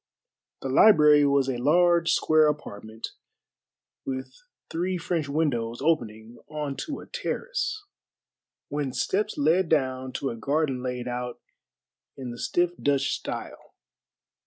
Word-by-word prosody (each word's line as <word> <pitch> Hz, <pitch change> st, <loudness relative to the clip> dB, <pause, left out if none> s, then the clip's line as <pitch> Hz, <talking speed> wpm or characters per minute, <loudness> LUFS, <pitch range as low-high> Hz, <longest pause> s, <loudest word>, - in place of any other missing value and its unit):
The 135 Hz, -, -2 dB
library 150 Hz, -3 st, +6 dB
was 140 Hz, -1 st, +2 dB
a 130 Hz, -2 st, -1 dB
large 170 Hz, +5 st, +3 dB
square 155 Hz, -1 st, +4 dB
apartment, 110 Hz, -6 st, -5 dB, 0.9 s
with 130 Hz, 0 st, -5 dB, 0.4 s
three 180 Hz, +2 st, -1 dB
French 165 Hz, -3 st, -2 dB
windows 120 Hz, -7 st, -1 dB
opening 120 Hz, -7 st, -1 dB
on 150 Hz, -2 st, -4 dB
to 290 Hz, -, -5 dB
a -, -, -11 dB
terrace, 485 Hz, -2 st, -3 dB, 0.8 s
whence 140 Hz, -3 st, -3 dB
steps 210 Hz, +2 st, 0 dB
led 160 Hz, +4 st, +2 dB
down 130 Hz, -4 st, 0 dB
to 135 Hz, -, -2 dB
a -, -, -6 dB
garden 135 Hz, +2 st, -1 dB
laid 125 Hz, -1 st, -4 dB
out 125 Hz, 0 st, -4 dB, 0.8 s
in 130 Hz, -3 st, -6 dB
the 120 Hz, -, -9 dB
stiff 175 Hz, +6 st, +1 dB
Dutch 140 Hz, -1 st, +1 dB
style. -, -, -7 dB
145 Hz, 125 wpm, -26 LUFS, 125-165 Hz, 0.9 s, library